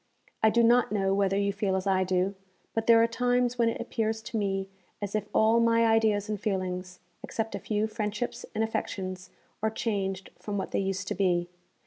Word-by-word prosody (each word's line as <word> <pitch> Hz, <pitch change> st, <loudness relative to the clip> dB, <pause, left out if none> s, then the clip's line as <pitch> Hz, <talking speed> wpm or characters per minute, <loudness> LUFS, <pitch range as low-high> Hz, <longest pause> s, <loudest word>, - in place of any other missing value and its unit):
I 220 Hz, -, +6 dB
do 235 Hz, +2 st, +3 dB
not 240 Hz, 0 st, +4 dB
know 195 Hz, -2 st, +1 dB
whether 195 Hz, 0 st, +2 dB
you 200 Hz, 0 st, +1 dB
feel 200 Hz, -2 st, 0 dB
as 190 Hz, 0 st, -2 dB
I 190 Hz, -1 st, +3 dB
do, 185 Hz, +1 st, +1 dB, 0.4 s
but 225 Hz, 0 st, -1 dB
there 230 Hz, -1 st, +7 dB
are -, -, +4 dB
times 245 Hz, +1 st, +1 dB
when 230 Hz, -1 st, +4 dB
it -, -, -4 dB
appears 225 Hz, -2 st, -2 dB
to 235 Hz, +1 st, -7 dB
me 195 Hz, -2 st, -1 dB, 0.3 s
as 205 Hz, -1 st, -4 dB
if 215 Hz, -1 st, -1 dB
all 220 Hz, +2 st, +4 dB
my 230 Hz, 0 st, +4 dB
ideas 220 Hz, -2 st, +3 dB
and 210 Hz, -2 st, -3 dB
feelings, 185 Hz, -3 st, -3 dB, 0.2 s
except 225 Hz, -1 st, -3 dB
a -, -, -3 dB
few 210 Hz, 0 st, -1 dB
friendships 215 Hz, +1 st, -3 dB
and 220 Hz, -, +1 dB
affections, 185 Hz, -4 st, -4 dB, 0.3 s
are 220 Hz, -, +2 dB
changed 195 Hz, -4 st, -2 dB
from 205 Hz, -1 st, -4 dB
what 190 Hz, -, -3 dB
they -, -, 0 dB
used 195 Hz, 0 st, -2 dB
to -, -, 0 dB
be. 175 Hz, -2 st, +1 dB
210 Hz, 200 wpm, -28 LUFS, 195-225 Hz, 0.4 s, there